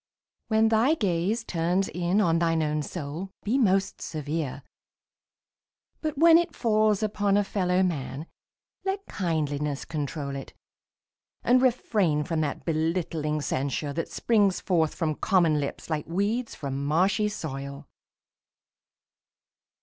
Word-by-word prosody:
When 220 0 +3
thy 230 +8 +3
gaze 200 - 0
Turns 180 +1 0
in 180 +3 0
on 165 -4 +3
thine 165 -1 +2
own 150 0 0
soul, 160 +4 -5
be 240 +6 +1
most 195 -4 +2
severe. 150 -3 -4 1.4
But 310 -3 -3
when 330 +2 +7
it 345 -2 -2
falls 215 -2 +2
upon 205 -1 +1
a 205 - +3
fellow 185 -2 +1
man 150 -4 -3 0.6
Let 390 +1 -2
kindliness 150 -5 -2
control 145 -2 -4
it; 135 - -8 0.9
and 250 +1 +4
refrain 210 - +2
From 165 -1 -1
that 145 -2 -3
belittling 160 -2 -1
censure 140 +1 -2
that 165 +2 -3
springs 205 -5 +2
forth 165 -4 +1
From 155 -2 0
common 170 -3 +2
lips 140 -1 -4
like 155 -2 -2
weeds 205 +8 -1
from 140 -1 -4
marshy 185 +8 +2
soil. 140 -5 -6
170 Hz, 125 wpm, -27 LUFS, 150-210 Hz, 1.4 s, when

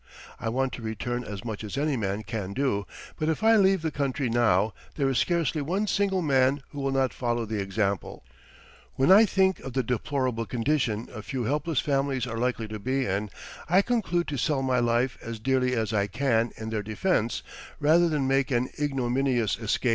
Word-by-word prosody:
I 115 - -2
want 130 +2 -1
to 120 - -6
return 120 +2 -3
as 105 -1 -7
much 110 -2 -5
as 105 +4 -5
any 145 0 +1
man 105 -2 -2
can 105 -3 -4
do; 120 -6 0 0.3
but 155 - 0
if 160 +6 -1
I 225 0 +6
leave 195 -4 +4
the 160 - -1
country 140 -3 -1
now 110 -3 +3 0.2
there 140 -3 +1
is 130 -3 +1
scarcely 165 -2 +1
one 185 +9 -1
single 195 -3 +1
man 135 -1 +2
who 145 - -8
will 135 0 0
not 135 -4 +1
follow 120 -1 -1
the 110 -1 -2
example. 100 0 -2 0.7
When 135 +7 +3
I 210 +3 +8
think 190 -1 +2
of 135 - -8
the 130 0 +1
deplorable 125 -1 -1
condition 120 -3 0
a 110 - -6
few 125 +4 -4
helpless 150 +4 0
families 135 -3 0
are 115 -2 -4
likely 120 -2 -1
to 110 0 -5
be 130 +4 0
in, 100 +2 -1 0.4
I 185 +4 +5
conclude 195 -8 0
to 145 - -3
sell 135 +1 0
my 130 -1 +2
life 120 +2 +1
as 115 0 -6
dearly 125 +2 +1
as 110 -2 -1
I 100 -1 +1
can 115 0 +1
in 110 0 -5
their 110 -1 -1
defense 110 - -1 0.4
rather 165 +3 +4
than 145 -4 0
make 135 +1 +2
an 125 -1 0
ignominious 130 -4 +1
escape." 115 +2 0
130 Hz, 200 wpm, -27 LUFS, 115-145 Hz, 0.7 s, I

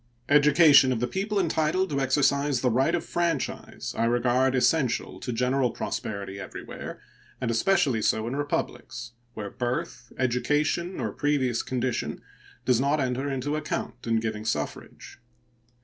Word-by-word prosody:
Education 145 -1 +6
of 125 - 0
the 125 - +1
people 200 - -1
entitled 170 +1 +1
to 140 -1 0
exercise 140 0 +2
the 125 - +2
right 135 +8 +2
of 170 - -3
franchise 170 -5 -2
I 115 - +1
regard 125 +2 +2
essential 130 0 +1
to 125 - -4
general 125 +2 +1
prosperity 100 -3 -4
everywhere, - - -8 0.4
and 120 -2 -1
especially 130 - +2
so 110 +1 +1
in 125 - -3
republics, 120 -4 -3 0.2
where 105 -2 -5
birth, 120 -1 -4
education, 150 +8 0
or - - -2
previous 135 -5 0
condition 125 -2 -2 0.4
does 125 -1 +3
not 140 +2 +2
enter 130 +1 -1
into 135 +3 -2
account 155 -5 -4
in 115 -1 +2
giving 110 -1 -3
suffrage. 75 -10 -5
130 Hz, 140 wpm, -26 LUFS, 120-150 Hz, 0.4 s, Education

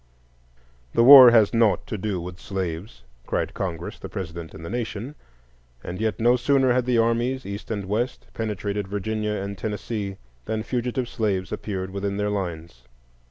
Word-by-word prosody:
The 115 - +5
war 130 -1 +11
has 115 -2 +4
naught 115 -3 +3
to - - -5
do 100 -2 -2
with 90 +1 -8
slaves, 90 - -5 0.2
cried - - -1
Congress, 85 -3 -5
the - - -8
President, 85 -4 -6
and 80 - -9
the - - -6
Nation; 120 +2 -4 0.7
and 90 +4 -6
yet 110 -1 -1
no 120 +2 +4
sooner 130 0 +3
had 125 -1 +1
the 125 -2 +2
armies, 120 +3 +1
East 100 +1 -7
and 105 -3 -3
West, 110 +6 -2
penetrated 105 -2 -3
Virginia 105 +2 -2
and 100 0 -4
Tennessee 105 -2 -4 0.3
than 110 0 -2
fugitive 125 +1 -2
slaves 100 -5 -2
appeared 95 -2 -4
within 100 0 -3
their 105 0 0
lines. 85 -9 -5
105 Hz, 160 wpm, -24 LUFS, 95-115 Hz, 0.7 s, war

